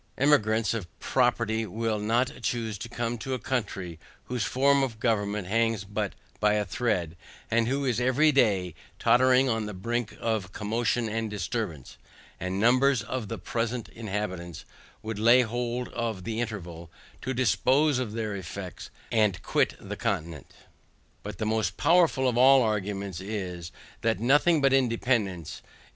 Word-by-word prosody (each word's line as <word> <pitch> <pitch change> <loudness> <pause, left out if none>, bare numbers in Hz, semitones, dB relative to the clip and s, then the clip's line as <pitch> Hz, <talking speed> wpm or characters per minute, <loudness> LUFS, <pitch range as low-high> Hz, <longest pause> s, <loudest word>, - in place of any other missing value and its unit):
Emigrants 115 -7 +3
of 110 -6 -4
property 120 -3 +1
will 110 +1 -2
not 120 +4 0
choose 115 -2 -2
to 105 +4 -7
come 120 0 -3
to 130 +3 -3
a - - -2
country 100 -10 -3 0.2
whose 125 -2 -3
form 140 +2 +3
of 120 -5 -2
government 105 -4 0
hangs 115 0 +1
but 105 0 -3 0.3
by 105 0 +3
a 105 -1 0
thread, 90 -6 -1 0.4
and 115 0 +2
who 135 +2 0
is 125 -3 +1
every 130 +5 +4
day 100 - +2 0.2
tottering 130 +1 +4
on 115 -3 -1
the 105 - -6
brink 115 +4 -3
of 110 -5 -2
commotion 115 +3 -1
and 110 0 -2
disturbance; 105 - -4 0.4
and 90 +2 -3
numbers 125 +2 +4
of 115 0 -4
the 115 - -4
present 115 +4 -3
inhabitants 95 -6 -5 0.4
would 110 -1 -4
lay 120 +3 +6
hold 120 +1 -3
of 115 -5 -3
the 115 +2 -2
interval, 90 -7 -6 0.3
to 130 - -3
dispose 130 +4 +2
of 115 -5 -3
their 110 -2 -3
effects, 95 -1 -7 0.2
and 105 -5 +2
quit - - +1
the - - -6
continent. 80 -3 -3 0.7
But 105 -2 -7
the 110 - -2
most 110 -2 0
powerful 165 -6 +3
of 120 -1 +1
all 135 0 +7
arguments, 100 -4 -2
is, 95 -4 -5 0.3
that 115 -4 +1
nothing 145 +7 +4
but 135 -1 +4
independance, 115 - 0
i. - - -29
e. - - -26
115 Hz, 155 wpm, -27 LUFS, 100-125 Hz, 0.7 s, all